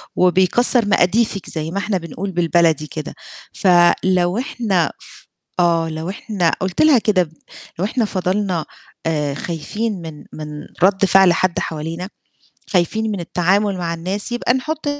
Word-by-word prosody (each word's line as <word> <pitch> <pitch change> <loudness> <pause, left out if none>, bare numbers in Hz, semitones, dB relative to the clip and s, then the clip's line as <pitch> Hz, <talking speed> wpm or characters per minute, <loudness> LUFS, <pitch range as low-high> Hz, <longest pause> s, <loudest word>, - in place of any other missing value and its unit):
وبيكسّر 190 +6 +3
مقاديفِك 200 +1 +1
زي 160 0 -3
ما 195 - -4
إحنا 200 0 0
بنقول 180 +3 -5
بالبلدي 170 -3 +2
كده، 155 -1 -6 0.4
فلو 180 +1 +3
إحنا 210 - 0
ف - - -15 0.3
آه، 165 -2 +2
لو 160 +2 -5
إحنا 195 -3 -1
قُلت 185 -1 -1
لها 310 -5 +6
كده 185 -7 +1 0.5
"لو 190 - +1
إحنا 225 +2 0
فضلنا 185 -3 -1 0.4
آآ، 150 -3 0
خايفين 185 +6 -4
من 160 -2 -9
من 155 -1 -7 0.4
رَد 195 +1 +4
فعل 190 -2 +6
حد 185 0 0
حوالينا، 165 +4 -4 0.6
خايفين 215 +5 +1
من 200 - -3
التعامل 190 +4 +1
مع 170 -1 -2
الناس 190 +7 -3
يبقى 240 +1 +1
نحُط 310 +4 -3
185 Hz, 140 wpm, -19 LUFS, 170-205 Hz, 0.6 s, لها